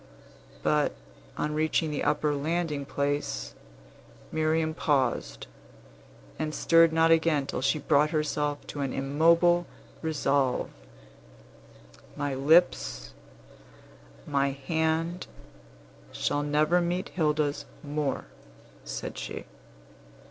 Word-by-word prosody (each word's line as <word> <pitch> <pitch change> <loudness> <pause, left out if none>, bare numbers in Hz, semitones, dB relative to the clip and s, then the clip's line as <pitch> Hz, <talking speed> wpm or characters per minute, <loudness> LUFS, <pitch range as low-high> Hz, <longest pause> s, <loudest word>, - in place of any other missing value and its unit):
But, 150 -1 +2 0.4
on 150 - -1
reaching 155 0 +1
the 150 - -2
upper 150 0 +1
landing 150 0 -2
place, 140 - -2 0.8
Miriam 160 0 +1
paused, 145 -5 0 0.9
and 155 0 -2
stirred 165 0 +5
not 165 0 +3
again 160 -3 +3
till 130 - -4
she 140 +3 +2
had 145 - -11
brought 150 +2 +4
herself 150 -2 -1
to 145 - -7
an 135 -2 -2
immovable 165 +5 +3 0.3
resolve. 140 -4 0 1.4
"My 145 -1 -2
lips, 130 - +2 1.1
my 140 -1 +1
hand, 160 +5 -1 0.8
shall 145 - -1
never 150 +4 +2
meet 175 +2 -2
Hilda's 150 -3 0 0.2
more," 145 -1 -2 0.6
said - - -6
she. - - -6
150 Hz, 100 wpm, -28 LUFS, 140-160 Hz, 1.4 s, stirred